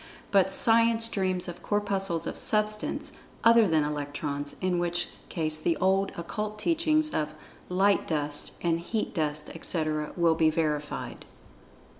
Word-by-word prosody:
But 190 -1 +4
Science 230 +2 +4
dreams 185 -4 -1
of 175 0 -7
Corpuscles 195 -4 -1
of - - -4
Substance 215 0 0 0.3
other 230 -2 +6
than 160 -3 +3
Electrons, 145 -1 -4
in 180 -1 0
which 175 0 -1 0.2
case 155 -2 -1
the 165 +1 0
old 190 +1 +2
Occult 210 +5 -4
teachings 310 +4 +1
of 155 0 -2 0.3
"light 195 +2 +2
dust" 145 -2 -2
and 165 -1 +1
"heat 215 +6 -3
dust," 150 -3 -2
etc., 155 -2 -1
will 170 -1 +4
be 160 0 +3
verified. 150 -2 -2
175 Hz, 135 wpm, -28 LUFS, 155-210 Hz, 0.3 s, other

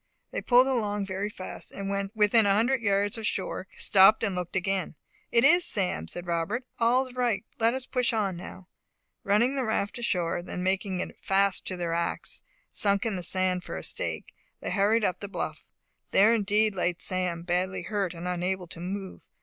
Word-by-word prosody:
They - - -3
pulled 250 +1 +5
along 210 -6 0
very 195 +2 -3
fast, 185 -3 -7
and 195 0 -6
when 200 0 -2
within 210 0 +4
a 195 - +4
hundred 245 +4 +2
yards 205 +1 +1
of 220 - -1
shore 190 0 -3
stopped 195 +3 +5
and 200 -4 0
looked 180 0 -4
again. 190 -2 -1 0.4
"It 235 +1 +4
is 350 +4 +6
Sam," 180 - 0
said 175 - -6
Robert. 175 +9 -1
"All's 250 +2 +2
right! 245 -4 0
Let 230 +2 +3
us 260 -1 -4
push 250 -2 0
on 205 -5 0
now!" 180 +1 -10 0.6
Running 215 +6 +3
the 270 -2 -1
raft 220 -1 -1
ashore, 180 -8 0
and 180 +1 -5
making 190 0 0
it - - -6
fast 195 0 +1
to 185 - -3
their 170 -1 -2
ax, 170 0 -2 0.3
sunk 200 +2 +2
in 220 -3 0
the 180 - -3
sand 185 +1 +1
for - - -6
a - - -6
stake, - - -4 0.3
they - - -4
hurried 210 +2 +3
up 180 0 -1
the 200 - -5
bluff. 200 - -5 0.4
There 210 +4 +5
indeed 215 0 +2
lay 180 -2 0
Sam, 180 -2 -2
badly 180 +1 -1
hurt 195 -3 -2
and 170 +2 -6
unable 180 +1 -1
to 165 - -7
move. 190 +2 -5
200 Hz, 190 wpm, -28 LUFS, 185-225 Hz, 0.6 s, is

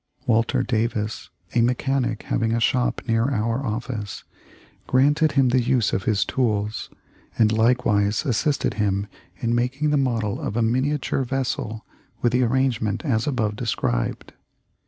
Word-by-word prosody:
Walter 115 0 +2
Davis, 110 -2 -2 0.2
a 120 - +3
mechanic 125 -1 0
having 115 -1 0
a 115 - +1
shop 125 +2 +1
near 115 0 +2
our 115 +1 -1
office, 110 -3 -4 0.6
granted 145 +4 +3
him 135 -2 +4
the 125 +1 +3
use 120 -2 +1
of 95 - -1
this 105 -2 +2
tools, 105 -4 -1 0.5
and 110 -2 +4
likewise 110 -1 +2
assisted 140 +3 0
him 100 -2 0 0.3
in 115 -1 -1
making 135 +5 0
the 150 - +3
model 115 -6 0
of 105 - -3
a 120 - +2
miniature 130 +4 0
vessel 125 -4 -3 0.4
with 120 - +3
the 125 +2 +2
arrangement 120 - 0
as 120 -2 0
above 110 -7 0
described. - - -2
120 Hz, 140 wpm, -23 LUFS, 110-130 Hz, 0.6 s, him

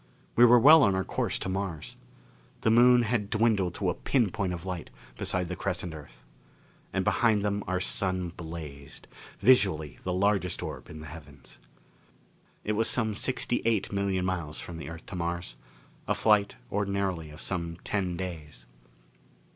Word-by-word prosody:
We 120 - +8
were 120 +1 +7
well 150 +6 +8
on 100 -6 +4
our 95 - 0
course - - -2
to - - -4
Mars. 95 -4 -4 0.7
The 110 - +3
Moon 120 +1 +6
had 110 -3 -1
dwindled 105 -6 +1
to - - 0
a - - -2
pin 120 -8 +1
point 95 -3 -2
of 85 0 -6
light 90 -2 -5 0.3
beside 90 +7 -1
the 90 - -4
crescent 90 -3 -3
Earth. 75 -6 -12 0.7
And 95 0 -1
behind 110 -4 +3
them 100 0 -1
our 95 0 0
Sun 95 -1 -1
blazed, 80 -5 -9 0.3
visually 95 - +3
the 90 - -2
largest 95 -1 +1
orb - - -7
in 75 0 -9
the - - -9
heavens. 70 -4 -13 1.0
It 105 - -1
was 110 +2 +2
some 110 -3 +2
sixty 120 +2 -1
eight 110 -4 +1
million 100 -2 0
miles 85 -5 -3
from 85 - -8
the 80 -2 -7
Earth 80 -1 -9
to - - -8
Mars. 85 -7 -3 0.5
A - - +1
flight, 105 - +3 0.2
ordinarily, 100 -5 -1
of 75 +1 -12
some 85 -3 -3
ten 95 -4 -2
days. 80 -9 -7
95 Hz, 165 wpm, -28 LUFS, 85-105 Hz, 1.0 s, We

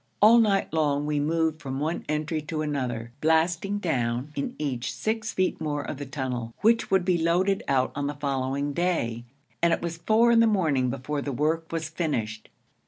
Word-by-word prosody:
All 225 +3 +7
night 200 -6 +2
long 145 -2 +1
we 150 -1 0
moved 160 +1 0
from 135 -3 -4
one 160 +4 -2
entry 155 +1 -1
to 155 +1 -3
another, 125 -6 -3
blasting 165 +5 +2
down 130 - -1
in 140 - -3
each 130 -5 -2
six 220 0 -2
feet 185 0 0
more 145 -2 -2
of 135 - -5
the 145 0 -6
tunnel, 125 -4 -4
which 230 +1 +3
would 190 -2 +2
be 180 -2 +2
loaded 180 +4 +2
out 130 -2 +2
on 140 0 -2
the 145 - -3
following 140 0 -2
day; 120 -10 -1 0.4
and 170 0 +4
it - - +1
was 170 -1 -3
four 220 +7 +3
in 230 - +5
the 230 - +6
morning 155 - +2
before 135 +3 -3
the 140 - -3
work 160 +5 -1
was 165 -1 -2
finished. 120 -10 -3
155 Hz, 190 wpm, -26 LUFS, 135-175 Hz, 0.4 s, All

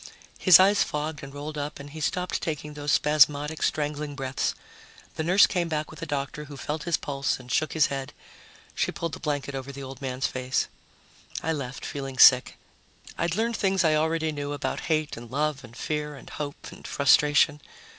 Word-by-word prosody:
His 185 -3 +8
eyes 200 +2 +5
fogged 150 0 -2
and 140 - -9
rolled 145 +2 -6
up 145 0 -5
and 140 0 -9
he 155 +1 -8
stopped 180 +4 -1
taking 150 -2 -4
those 145 0 -2
spasmodic 150 +1 +3
strangling 150 -1 -1
breaths. 135 -1 -2 0.6
The 160 - -3
nurse 185 +5 +6
came 175 -3 -1
back 155 -1 -2
with 155 - -11
the 165 - -5
doctor, 145 +1 -3
who 145 -1 -10
felt 150 +2 -4
his 170 -3 +2
pulse 140 -2 -2
and 125 0 -11
shook 155 +3 +1
his 160 -2 +4
head. 135 -1 -4 0.6
She - - 0
pulled 165 -1 -4
the - - -6
blanket 145 -3 -2
over 135 0 -5
the 140 0 -8
old 135 0 -9
man's 130 0 -2
face. 130 0 -1 0.8
I 160 - 0
left, 135 -4 -5
feeling 135 -2 -5
sick. 125 0 +7 0.6
I'd 170 0 -1
learned 230 +2 0
things 195 -2 +2
I 160 -2 +4
already 160 +1 +1
knew 145 -1 -4
about 145 - -3
hate 155 -2 0
and 115 0 -9
love 145 +1 -1
and 120 0 -13
fear 150 0 -3
and 140 - -12
hope 145 -1 -6
and - - -11
frustration. 145 +1 +4
150 Hz, 195 wpm, -26 LUFS, 140-155 Hz, 0.8 s, His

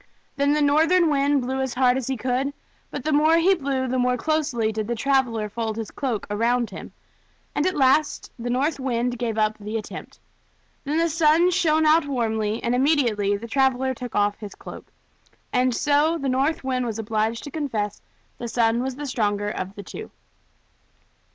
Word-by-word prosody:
Then 280 +1 +2
the 300 0 +2
North 300 +3 +3
Wind 290 -6 +3
blew 265 +2 -2
as 265 -2 -3
hard 250 -1 +3
as 265 -2 -3
he 265 -1 -1
could, 255 +4 -1 0.4
but - - -6
the 310 - -1
more 310 +3 +4
he 355 +4 +4
blew 270 -6 -1
the 255 +1 -1
more 250 0 +2
closely 290 -7 0
did 215 -1 -3
the 235 - -1
traveler 240 -4 +1
fold 220 +1 -4
his 225 -2 -5
cloak 245 -8 -3
around 235 +3 +1
him; - - -9 0.6
and 295 - +1
at 370 - -1
last 280 +2 +2
the 240 +1 -4
North 280 +5 0
Wind 245 -2 -1
gave 230 -3 -2
up 215 0 +1
the 210 +2 -4
attempt. 215 - -8 0.7
Then 295 +3 -1
the 335 +1 +3
Sun 325 +2 +3
shined 315 -3 +2
out 310 0 +4
warmly, 220 -4 -1
and 235 - 0
immediately 245 -7 +2
the 230 +3 -8
traveler 265 +1 +1
took 245 -1 -8
off 205 0 +1
his 210 -2 -8
cloak. - - -11 0.6
And 250 -1 +2
so 295 +5 +2
the 275 -4 -2
North 275 +5 0
Wind 255 -1 -1
was 225 -2 -3
obliged 220 +1 -1
to 290 - -8
confess 225 -10 -2 0.4
that 240 - -5
the - - -3
Sun 230 0 +1
was 260 0 -3
the 290 +2 -6
stronger 205 -6 -1
of 190 0 -5
the 200 - -8
two. 435 - -8
255 Hz, 190 wpm, -24 LUFS, 225-290 Hz, 0.7 s, more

